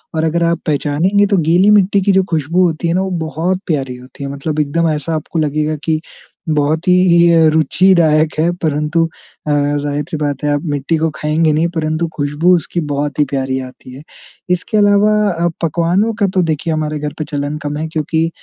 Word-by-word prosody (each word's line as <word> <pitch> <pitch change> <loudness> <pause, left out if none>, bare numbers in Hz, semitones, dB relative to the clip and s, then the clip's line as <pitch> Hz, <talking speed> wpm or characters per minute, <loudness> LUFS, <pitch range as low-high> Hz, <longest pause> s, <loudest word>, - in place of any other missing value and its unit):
और 160 - 0
अगर 170 +1 0
आप 170 0 +1
पहचानेंगे 155 +7 +1
तो 200 -2 +1
गीली 175 +5 +3
मिट्टी 200 -1 +4
की 200 - +2
जो 190 0 +3
खुशबू 165 +3 +1
होती 165 0 -1
है 165 - 0
ना, 185 - +1
वो 190 -1 -3 0.2
बहुत 175 +4 -1
प्यारी 135 -6 -2
होती 125 +2 -12
है 140 - -4
मतलब 150 +2 -3
एकदम 160 +3 +1
ऐसा 155 +1 -2
आपको 155 +2 -3
लगेगा 155 +1 -1
कि 160 -1 0 0.5
बहुत 155 +3 0
ही 180 - +5 0.3
ये 165 -2 +5
रुचिदायक 160 0 +3
है 165 +2 +2
परंतु 150 +2 +1 0.4
अ, - - +1
ज़ाहिर-सी 145 +1 -1
बात 145 -2 -3
है, 150 - +1
आप 145 - -1
मिट्टी 145 +2 -1
को 160 +1 0
खाएँगे 155 +1 +1
नहीं, 160 +3 +1
परंतु 155 +1 -1
खुशबू 150 +5 +2
उसकी 170 +1 -3
बहुत 145 +1 -2
ही 150 - +4
प्यारी 130 -1 -2
आती 130 0 -10
है। 135 - -10 0.5
इसके 180 +4 -1
अलावा 205 +1 +4 0.2
अ, 170 0 -1 0.2
पकवानों 175 +7 +1
का 200 - +3
तो 185 - +3
देखिए, 160 0 -1
हमारे 155 -1 -2
घर 150 0 -4
पे - - -1
चलन 145 +1 -3
कम 145 0 -3
है 160 +1 -3
क्योंकि 160 +1 -1
155 Hz, 200 wpm, -16 LUFS, 145-170 Hz, 0.5 s, ही